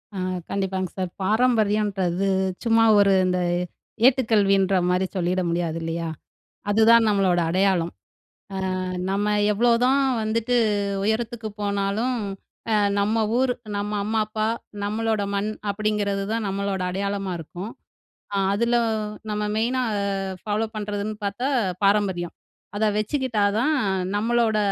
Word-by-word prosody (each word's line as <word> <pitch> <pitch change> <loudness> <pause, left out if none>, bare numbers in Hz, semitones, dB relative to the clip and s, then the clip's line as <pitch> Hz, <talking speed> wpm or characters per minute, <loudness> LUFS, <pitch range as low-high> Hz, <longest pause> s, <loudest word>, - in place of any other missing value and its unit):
அ - - -5 0.3
கண்டிப்பாங்க 190 -2 -2
சார். 185 -2 -2
பாரம்பரியம்ன்றது, 205 -4 +1 0.4
சும்மா 225 -1 +4 0.2
ஒரு 200 -1 +5
இந்த 180 0 +1 0.7
ஏட்டுக்கல்வின்ற 200 -7 +3
மாதிரி 180 +1 +2
சொல்லிட 180 +1 0
முடியாது, 170 -1 -1
இல்லையா. 165 0 -3 0.6
அதுதான் 225 +2 +6
நம்மளோட 195 -4 +2
அடையாளம். 185 -2 +1 0.6
அ - - -3 0.5
நம்ம 200 +2 0 0.2
எவ்வளோதான் 245 +5 +3 0.2
வந்துட்டு 230 +3 0 0.5
உயரத்துக்கு 220 +1 -1
போனாலும், 200 +5 0 0.5
அ - - +3 0.3
நம்ம 210 +2 +1 0.2
ஊர், 255 0 +2 0.2
நம்ம 205 +1 -3
அம்மா 220 0 +1
அப்பா, 215 0 -1 0.4
நம்மளோட 220 0 0
மண் 205 +2 -1 0.2
அப்படிங்கிறது 205 -1 -1
தான் 230 -1 -1
நம்மளோட 195 -1 -2
அடையாளமா 195 -1 -2
இருக்கும். 180 +6 -7 0.6
அ - - -1 0.2
அதில 235 +3 +1 0.6
நம்ம 210 0 -1
மெயினா 245 +4 +1 0.6
ஃபாலோ 215 +1 -1
பண்ணுறதுன்னு 210 0 -3
பார்த்தா 220 +7 -2 0.4
பாரம்பரியம். 195 -4 +1 0.4
அதை 220 - +2
வச்சுக்கிட்டா 230 -2 0
தான், 300 +6 +2 0.4
நம்மளோட 230 0 +2
205 Hz, 110 wpm, -24 LUFS, 195-225 Hz, 0.7 s, அதுதான்